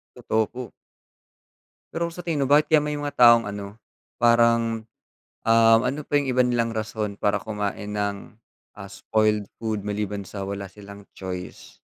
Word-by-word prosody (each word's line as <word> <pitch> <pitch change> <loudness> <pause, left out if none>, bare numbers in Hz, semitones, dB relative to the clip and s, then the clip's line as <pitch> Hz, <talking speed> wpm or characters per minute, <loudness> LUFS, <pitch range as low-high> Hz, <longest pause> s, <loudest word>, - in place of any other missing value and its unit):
Totoo 110 -1 0
po. 125 -3 -8 1.2
Pero 170 0 -2
sa 175 - -8
tingin 160 -5 -1
mo 135 - -2
bakit 150 +1 +5
kaya 155 -2 +4
may 150 0 -2
mga 145 0 -5
taong 120 -3 +6
ano, 100 +1 -8 0.4
parang, 115 -1 +3 0.6
um, 115 0 +6
ano 140 +4 -1
pa 145 0 0
yung 145 - 0
iba 125 - +4
nilang 120 -2 0
rason 110 -1 -3
para 105 0 0
kumain 105 -1 -4
ng, 100 +1 -3 0.4
ah, 100 -1 -10
spoiled 105 0 0 0.2
food 110 -2 -3
maliban 105 -1 -3
sa 100 +1 -7
wala 100 0 -4
silang 100 +1 -12
choice? 90 -1 -8
110 Hz, 155 wpm, -24 LUFS, 100-120 Hz, 1.2 s, taong